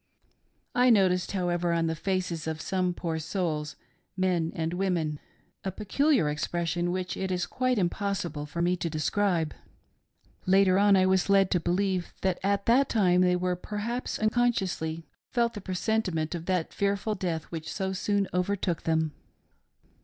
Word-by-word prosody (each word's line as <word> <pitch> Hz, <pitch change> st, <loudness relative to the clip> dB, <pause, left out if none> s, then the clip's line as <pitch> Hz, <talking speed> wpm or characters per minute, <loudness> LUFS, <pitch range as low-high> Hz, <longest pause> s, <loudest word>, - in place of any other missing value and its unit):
I 250 Hz, +1 st, +4 dB
noticed, 185 Hz, -5 st, +3 dB
however, 175 Hz, -2 st, 0 dB
on 165 Hz, 0 st, +1 dB
the 160 Hz, -, 0 dB
faces 180 Hz, -2 st, -2 dB
of 160 Hz, -1 st, -3 dB
some 185 Hz, +2 st, 0 dB
poor 165 Hz, -2 st, -3 dB
souls 155 Hz, -3 st, -2 dB, 0.2 s
— -, -, -45 dB
men 170 Hz, -3 st, 0 dB
and 165 Hz, +1 st, -2 dB
women 175 Hz, -5 st, -1 dB, 0.2 s
— -, -, -42 dB
a 190 Hz, -, -2 dB
peculiar 240 Hz, -, +2 dB
expression 170 Hz, +3 st, -1 dB
which 180 Hz, 0 st, -3 dB
it 190 Hz, 0 st, -3 dB
is 180 Hz, -1 st, 0 dB
quite 255 Hz, -1 st, 0 dB
impossible 175 Hz, -5 st, -2 dB
for 170 Hz, +3 st, -2 dB
me 180 Hz, +1 st, +2 dB
to 170 Hz, -, -2 dB
describe. 165 Hz, +1 st, 0 dB, 0.9 s
Later 190 Hz, 0 st, +5 dB
on 205 Hz, 0 st, +5 dB
I 185 Hz, -1 st, +4 dB
was 190 Hz, 0 st, +2 dB
led 195 Hz, -1 st, +4 dB
to 180 Hz, -, +3 dB
believe 180 Hz, +1 st, -1 dB
that 190 Hz, -2 st, 0 dB
at 200 Hz, 0 st, 0 dB
that 255 Hz, +4 st, +4 dB
time 180 Hz, -5 st, +3 dB
they, 180 Hz, 0 st, +3 dB, 0.2 s
perhaps 225 Hz, +4 st, -3 dB
unconsciously, 195 Hz, -8 st, 0 dB, 0.2 s
felt 235 Hz, -1 st, +1 dB
the 205 Hz, -, -7 dB
presentiment 185 Hz, -4 st, -1 dB
of 170 Hz, -1 st, -6 dB
that 180 Hz, -3 st, 0 dB
fearful 200 Hz, +2 st, 0 dB
death 175 Hz, -5 st, -2 dB
which 160 Hz, -2 st, -5 dB
so 190 Hz, -1 st, -2 dB
soon 200 Hz, +1 st, 0 dB
overtook 180 Hz, -2 st, 0 dB
them. 160 Hz, -1 st, +1 dB
185 Hz, 160 wpm, -28 LUFS, 170-200 Hz, 0.9 s, Later